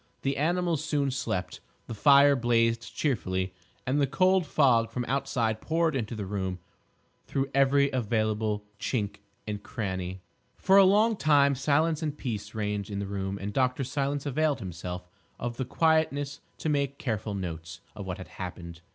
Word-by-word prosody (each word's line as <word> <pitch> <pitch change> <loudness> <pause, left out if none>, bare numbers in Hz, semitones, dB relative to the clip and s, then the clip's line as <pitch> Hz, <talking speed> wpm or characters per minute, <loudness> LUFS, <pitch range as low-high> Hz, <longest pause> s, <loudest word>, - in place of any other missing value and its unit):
The 135 0 0
animals 170 0 +1
soon 145 -4 0
slept; 95 -8 -3 0.3
the - - -6
fire 140 +5 +6
blazed 115 -1 +1
cheerfully; 95 -9 -1 0.3
and 135 +3 +1
the 140 - +3
cold 185 +5 +3
fog 120 -7 +3
from 120 +1 -3
outside 115 -4 -1
poured 165 -1 +1
into 115 -2 -2
the 105 -2 -4
room 95 -2 -3 0.7
through 135 0 -1
every 140 +1 +4
available 110 -3 0
chink 105 -5 -2 0.3
and 105 -1 -4
crannie. 95 -5 -4 0.4
For 195 +1 +4
a 195 - +8
long 215 +4 +4
time 145 -4 +4
silence 150 +4 +1
and 150 -2 -3
peace 110 -4 -5
reigned 105 -1 -2
in 100 - -4
the 100 - -2
room 95 0 -3
and 100 +1 -4
Dr. 130 +2 +1
Silence 140 +2 -2
availed 150 +1 +1
himself 90 0 -6 0.3
of 120 0 -4
the 130 - -2
quietness 145 -1 +1 0.2
to - - -4
make 140 -2 0
careful 110 -4 -3
notes 85 -1 -6
of 100 -3 -7
what 90 +1 -3
had 90 - -9
happened. 85 -2 -7
125 Hz, 160 wpm, -28 LUFS, 100-145 Hz, 0.7 s, a